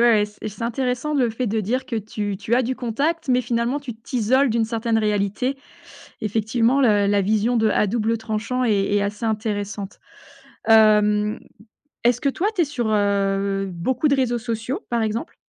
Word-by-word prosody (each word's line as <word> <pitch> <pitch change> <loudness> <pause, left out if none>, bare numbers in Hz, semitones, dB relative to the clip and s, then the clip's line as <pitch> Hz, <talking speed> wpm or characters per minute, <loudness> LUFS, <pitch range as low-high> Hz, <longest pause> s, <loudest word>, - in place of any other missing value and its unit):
ouais 235 -3 +5 0.2
et - - -3
c'est 210 +2 -9
intéressant 250 +4 -1
le 255 -5 +2
fait 235 +2 -3
de 220 +1 0
dire 250 +6 -1
que 235 - -3
tu 205 -2 -3
tu 230 +4 -1
as 255 - +3
du 255 +2 -2
contact 285 +7 -2
mais, 250 0 +3
finalement, 240 +4 -1
tu 260 -4 -6
t'isoles 250 +4 +1
d'une 225 0 +1
certaine 225 0 -1
réalité. 210 +5 0 0.6
Effectivement 225 +5 +1
le 205 -5 +4
la 200 0 +3
vision 215 +4 +1
de 220 -1 +3
à - - +2
double 225 +2 0
tranchant 225 +3 -2
est 205 -3 +1
est 205 - +2
assez 205 +3 -3
intéressante, 205 -2 -3 0.7
hem, 210 -1 +4 0.7
est-ce 245 +1 +3
que 280 - +1
toi 345 +8 -1
tu 355 - +2
es - - +3
sur, 265 -5 -3
heu, 200 -1 +1
beaucoup 255 - 0
de 280 - +3
réseaux 245 -2 +1
sociaux, 230 +2 -4
par 235 -1 0
exemple? 220 +8 -3
225 Hz, 180 wpm, -22 LUFS, 210-250 Hz, 0.7 s, ouais